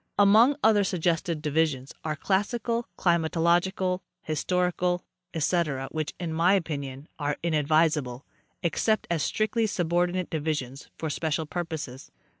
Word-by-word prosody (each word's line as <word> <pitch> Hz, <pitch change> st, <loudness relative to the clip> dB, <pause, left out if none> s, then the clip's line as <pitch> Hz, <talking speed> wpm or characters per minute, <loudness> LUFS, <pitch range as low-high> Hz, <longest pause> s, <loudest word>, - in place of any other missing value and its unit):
Among 220 Hz, +7 st, +6 dB
other 215 Hz, -2 st, +5 dB
suggested 170 Hz, -3 st, 0 dB
divisions 150 Hz, -3 st, 0 dB
are 155 Hz, -1 st, -2 dB
classical, 230 Hz, -, -1 dB
climatological, 175 Hz, +2 st, +2 dB, 0.2 s
historical, 180 Hz, +2 st, 0 dB, 0.3 s
ete, 150 Hz, -4 st, 0 dB
which, 155 Hz, -2 st, -3 dB
in 170 Hz, -3 st, -3 dB
my 170 Hz, +4 st, +4 dB
opinion, 140 Hz, -5 st, -3 dB
are 145 Hz, 0 st, -1 dB
inadvisable, 150 Hz, -5 st, +1 dB, 0.4 s
except 215 Hz, +6 st, +1 dB
as 165 Hz, -3 st, +1 dB
strictly 220 Hz, +6 st, +1 dB
subordinate 175 Hz, -1 st, 0 dB
divisions 145 Hz, -4 st, -3 dB
for 160 Hz, -2 st, -3 dB
special 160 Hz, +1 st, -1 dB
purposes. 155 Hz, -6 st, -5 dB
165 Hz, 110 wpm, -27 LUFS, 150-185 Hz, 0.4 s, Among